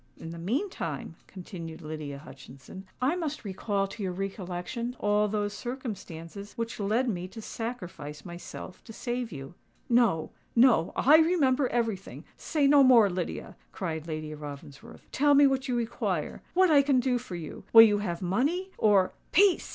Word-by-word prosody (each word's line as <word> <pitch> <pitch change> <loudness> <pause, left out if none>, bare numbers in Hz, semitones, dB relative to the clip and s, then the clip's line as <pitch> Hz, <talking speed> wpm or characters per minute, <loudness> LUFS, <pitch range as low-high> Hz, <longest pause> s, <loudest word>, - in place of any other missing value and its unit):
In 165 - -8
the 170 - -8
meantime," 180 - -3
continued 170 -3 -9
Lydia 150 -2 -6
Hutchinson, 140 +6 -12
"I 265 +7 +1
must 310 -8 -4
recall 195 +1 -1
to 210 - -9
your 190 -2 -1
recollection 195 +5 -4
all 210 0 +2
those 205 0 -2
circumstances 205 -7 -7
which 230 -1 -5
led 220 +6 +1
me 180 -5 -2
to 225 - -11
sacrifice 185 -11 -6
myself 175 +1 -9
to 225 - -10
save 240 0 -3
you." 135 0 -8 0.4
"No—no: 230 -1 +2
I 300 +4 +6
remember 295 -5 +3
everything. 225 -5 -3
Say 300 -3 0
no 285 0 +6
more, 235 -6 +6
Lydia," 175 -1 -4 0.2
cried 160 -4 -4
Lady 155 -1 -5
Ravensworth. 145 -1 -10
"Tell 290 +1 +4
me 285 +1 +7
what 270 0 +1
you 250 - 0
require—what 320 +9 0
I 285 -2 +7
can 275 -2 +3
do 250 -1 +1
for 230 -7 -8
you! 165 -3 -8
Will 225 0 +11
you 205 -2 +4
have 185 -3 -3
money? 295 - 0
or——" 200 -4 +4 0.2
"Peace! 390 +1 +4
210 Hz, 155 wpm, -28 LUFS, 175-255 Hz, 0.4 s, Will